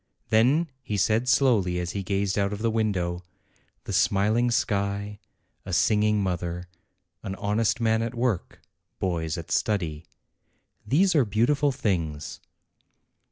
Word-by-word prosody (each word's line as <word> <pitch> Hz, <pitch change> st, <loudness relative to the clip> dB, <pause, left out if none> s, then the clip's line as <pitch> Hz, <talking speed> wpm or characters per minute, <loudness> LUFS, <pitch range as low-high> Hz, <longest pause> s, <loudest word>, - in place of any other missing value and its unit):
Then 135 Hz, +9 st, +3 dB
he 105 Hz, -5 st, -3 dB
said, 110 Hz, +5 st, +1 dB
slowly, 115 Hz, -9 st, +3 dB
as 90 Hz, 0 st, -2 dB
he 100 Hz, -, -3 dB
gazed 100 Hz, +1 st, -1 dB
out 100 Hz, 0 st, +1 dB
of 105 Hz, +2 st, -5 dB
the 115 Hz, -, +2 dB
window: 95 Hz, -6 st, -1 dB, 0.6 s
"The -, -, -5 dB
smiling 110 Hz, +5 st, +2 dB
sky, 100 Hz, -4 st, -1 dB, 0.4 s
a 95 Hz, -, -7 dB
singing 105 Hz, +3 st, +2 dB
mother, 90 Hz, -1 st, -3 dB, 0.5 s
an 95 Hz, -3 st, -5 dB
honest 105 Hz, +4 st, 0 dB
man 110 Hz, -1 st, +2 dB
at 115 Hz, +1 st, -3 dB
work, 120 Hz, -6 st, -2 dB, 0.4 s
boys 80 Hz, -4 st, -2 dB
at -, -, -8 dB
study, 85 Hz, -7 st, -1 dB, 0.8 s
these 180 Hz, +7 st, +3 dB
are 150 Hz, -5 st, +4 dB
beautiful 125 Hz, +7 st, +2 dB
things." 80 Hz, -, -2 dB
105 Hz, 130 wpm, -26 LUFS, 95-115 Hz, 0.8 s, are